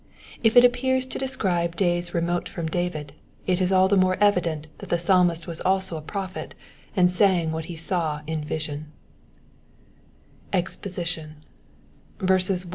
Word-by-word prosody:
IfU 240 +2 +7
appears 260 +1 +2
to 260 - -6
describe 180 -10 0
days 175 -1 0
re 170 - 0
mote 175 +1 -1
from 170 - -5
David, 160 -4 -3 0.3
it 185 0 +1
is 185 0 +2
aU 190 0 +5
the 200 - +3
more 185 -1 +3
evident 175 -7 +2
that - - -9
Uie 175 - +1
Psalmist 175 -2 +3
was 165 -2 -6
also 190 -2 +1
a 155 - -5
prophet, 190 +4 -6 0.4
ana 180 -1 +6
sang 180 -3 +3
uihai 160 0 -3
he 170 - -7
saw 160 -2 -1
in 155 0 -3
vision, 150 0 -4 1.6
EXPOSITION. 170 -4 -3
175 Hz, 140 wpm, -25 LUFS, 160-190 Hz, 1.6 s, IfU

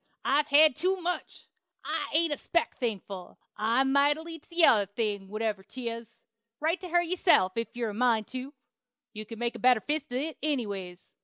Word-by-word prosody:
I've 290 +2 +2
hed 300 -1 +7
too 370 +5 +1
much. 355 0 -4 0.4
I - - -3
ain't 320 0 +2
a - - -4
speck 340 +4 0
thankful! 200 -6 -4 0.2
I'm 235 +5 +1
mightily 295 +4 +1
t'other 300 - +3
thing, 205 -1 -2
whatever 215 0 -3
'tis. 230 +1 -7 0.4
Write 325 +4 0
to 365 - -7
her 350 +1 +3
yourself, 340 - +3
if 230 +1 -4
you're 235 -3 -2
a - - -9
mind 225 -1 +2
tu. 260 +3 -7 0.6
You 215 0 -7
can 230 - -8
make 235 +1 -1
a - - -9
better 250 -2 +4
fist 295 +4 -3
at 250 - -1
it, 310 +4 -3
anyways. 200 -11 -3
255 Hz, 175 wpm, -28 LUFS, 215-310 Hz, 0.6 s, hed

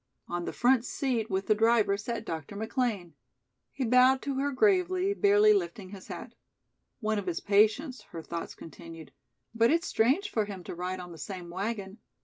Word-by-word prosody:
On 175 0 -3
the - - -3
front 245 -1 +3
seat 245 -4 -2
with 190 0 -1
the 215 - +4
driver 220 -2 +3
sat 220 +2 -5
Dr. 160 +3 -6
McLean. 220 - -2 0.6
He 270 - -3
bowed 255 +2 +5
to 280 - -2
her 285 +1 0
gravely, 370 +3 +2
barely 415 +1 +5
lifting 290 - -2
his 195 -1 -11
hat. - - -8 0.7
"One 215 -1 0
of 195 - -7
his 170 -2 -1
patients," 220 +7 +2
her 165 -1 -8
thoughts 170 +1 -6
continued, 165 -1 -11 0.4
"but 230 0 +3
it's 335 +2 +2
strange 280 - +1
for 215 -2 0
him 195 -3 -8
to - - -7
ride 180 +2 -4
on 180 -1 -8
the 165 - -11
same 180 +1 -7
wagon. 200 +2 -4
220 Hz, 180 wpm, -29 LUFS, 185-265 Hz, 0.7 s, bowed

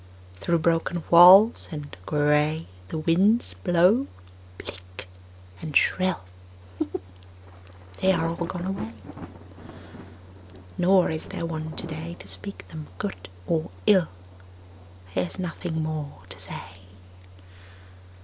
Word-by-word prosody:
Through 135 - 0
broken 165 +1 0
walls 185 +6 +8
and 150 -2 -7
gray 150 +1 +2 0.2
The 160 - -4
winds 190 +9 +2
blow 185 +9 +3 0.5
bleak 90 0 -10 0.5
and 155 -2 +1
shrill: 185 - +1 1.8
They 190 - +4
are 165 -3 +1
all 165 0 -1
gone 175 0 -5
away. 185 - -4 1.8
Nor 185 0 +4
is 160 - -4
there - - -4
one 160 -1 -5
today 165 0 -6
To - - -12
speak 95 0 -7
them 155 -1 -8
good 90 0 -5 0.2
or 165 0 -1 0.2
ill: 190 -6 +5 1.1
There 90 -1 0
is - - -7
nothing 170 -2 -3
more 155 - -5
to - - -9
say. 95 -2 -8
160 Hz, 110 wpm, -25 LUFS, 150-175 Hz, 1.8 s, walls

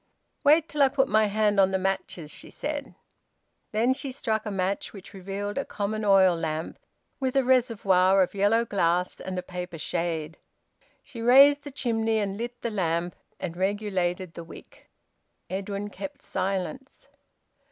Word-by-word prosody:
"Wait 305 +2 +5
till 295 - -2
I 275 - +7
put 270 0 +2
my 215 0 +3
hand 210 0 +2
on 190 -1 +5
the 190 - 0
matches," 185 -4 -3
she - - -8
said. 290 -2 -5 0.8
Then 230 +4 +2
she 275 0 -5
struck 220 -4 -2
a - - -1
match, 195 0 -2
which 195 -2 -12
revealed 200 +4 -4
a - - -1
common 215 +1 -3
oil 190 -3 +5
lamp, 160 -1 -4 0.4
with 260 -1 -1
a 270 - +4
reservoir 195 -7 +3
of 180 - -4
yellow 205 +4 +2
glass 180 -4 0
and 185 -1 -5
a 180 - -2
paper 180 -2 -6
shade. 160 -1 -3 0.6
She 245 -5 -9
raised 280 +4 +7
the - - -5
chimney 225 -4 0
and 200 -2 -1
lit 240 +3 -6
the 235 - -1
lamp, 175 -3 -1 0.2
and 170 -2 -4
regulated 185 -2 -1
the 170 - -8
wick. 165 - -14 0.6
Edwin 200 +2 -4
kept 285 +3 -8
silence. 195 +8 -4
200 Hz, 160 wpm, -26 LUFS, 185-240 Hz, 0.8 s, I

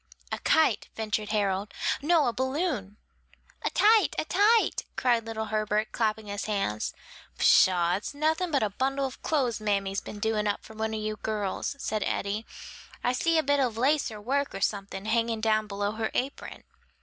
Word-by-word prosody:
"A - - -2
kite," 310 -10 +2
ventured 215 -1 -2
Harold. 200 -1 0 0.3
"No, 315 0 +3
a 240 - 0
balloon." 260 - -2 0.7
"A - - +1
tite! 430 -2 +4
a - - 0
tite!" 420 +7 +3
cried 235 -2 +1
little 220 -1 -3
Herbert, 215 0 0
clapping 220 -1 -1
his 205 0 -4
hands. 195 - -2 0.4
"Pshaw! 180 -1 +5
it's 210 - -7
nothing 315 +4 +1
but 280 -7 +1
a 210 - 0
bundle 270 +5 0
of 265 - -7
clothes 255 -8 0
mammy's 200 -2 0
been 210 - -8
doing 210 0 0
up 205 - -1
for 220 - -12
one 220 0 -2
of - - -2
you 215 0 -3
girls," 210 +4 -2
said 215 -6 -2
Eddie. 205 +3 -2 0.6
"I 245 - +2
see 330 +6 +2
a 315 - +3
bit 285 +1 +2
of 245 -5 0
lace 280 +4 +2
or 215 -2 -8
work, 275 +6 -1
or - - -5
something, 195 -1 -2
hanging 230 0 +1
down 215 -1 +1
below 205 0 -2
her 220 0 -2
apron." 270 +3 -3
220 Hz, 180 wpm, -28 LUFS, 210-270 Hz, 0.7 s, Pshaw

